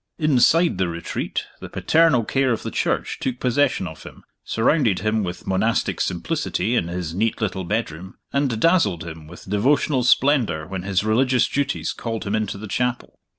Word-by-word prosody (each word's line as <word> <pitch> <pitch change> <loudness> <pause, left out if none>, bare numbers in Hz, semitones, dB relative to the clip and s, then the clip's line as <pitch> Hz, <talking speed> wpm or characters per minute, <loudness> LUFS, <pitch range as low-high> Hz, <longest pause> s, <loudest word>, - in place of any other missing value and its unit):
Inside 155 - +3
The 95 - +2
Retreat, 85 0 -4
the - - -8
paternal 160 -7 +3
care 135 +3 +1
of 115 - -2
the - - -4
Church - - -1
took 125 -2 -3
possession 125 -5 +1
of 80 -2 -8
him; - - -12 0.2
surrounded 115 - +1
him 110 0 +1
with 90 -1 -6
monastic 100 +5 0
simplicity 120 - -1
in 85 - +1
his 85 -2 -4
neat 110 +5 0
little 95 -3 -2
bedroom; 95 -3 -3 0.2
and 140 -5 0
dazzled 110 - +2
him 80 -2 -9
with 85 +3 -13
devotional 130 +7 +2
splendor 125 - +2
when 95 +1 -5
his 95 +1 0
religious 125 +4 +2
duties 140 0 -1
called 115 -2 -4
him 100 -1 -3
into 110 -2 -2
the 110 +2 -7
chapel. 125 +4 -2
110 Hz, 170 wpm, -22 LUFS, 95-130 Hz, 0.2 s, Inside